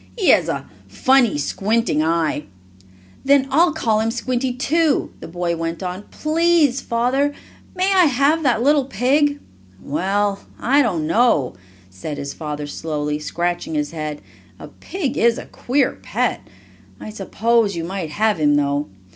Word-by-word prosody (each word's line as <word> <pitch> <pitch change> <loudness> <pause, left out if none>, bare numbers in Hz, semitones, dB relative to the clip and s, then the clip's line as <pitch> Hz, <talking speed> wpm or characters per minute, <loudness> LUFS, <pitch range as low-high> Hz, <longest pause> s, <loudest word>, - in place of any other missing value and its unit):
"He 395 - +2
has - - +4
a - - -3 0.2
funny, 260 - +3
squinting 200 +3 0
eye." 160 -2 0 0.8
"Then 275 -1 +4
I'll 330 +5 +4
call 230 -8 0
him 220 +1 0
Squinty, 250 +2 -1
too," 295 +5 +1
the - - -8
boy 175 0 -2
went 165 +2 -4
on. 185 +3 -5
"Please, 310 -4 +2
Father, 265 +5 0 0.4
may 375 +2 +1
I 370 -2 +6
have 285 +3 +2
that 245 -5 +1
little 285 0 +3
pig?" 285 +5 +1 0.4
"Well, 195 - -1 0.2
I 275 +4 +3
don't 180 - 0
know," 165 - +2 0.4
said 95 +11 -6
his 140 0 -5
father 150 -2 -5
slowly, 150 0 -3
scratching 175 +1 -3
his 150 -1 -1
head. 155 -2 -5 0.3
"A - - -10
pig 335 -9 -4
is 235 0 +3
a - - -7
queer 265 +2 -1
pet. - - -2 0.5
I 215 - -8
suppose 215 +1 0
you 165 - -3
might 180 -1 -4
have 210 +3 +1
him, 145 -1 +3
though. 145 0 0
220 Hz, 150 wpm, -20 LUFS, 160-275 Hz, 0.8 s, I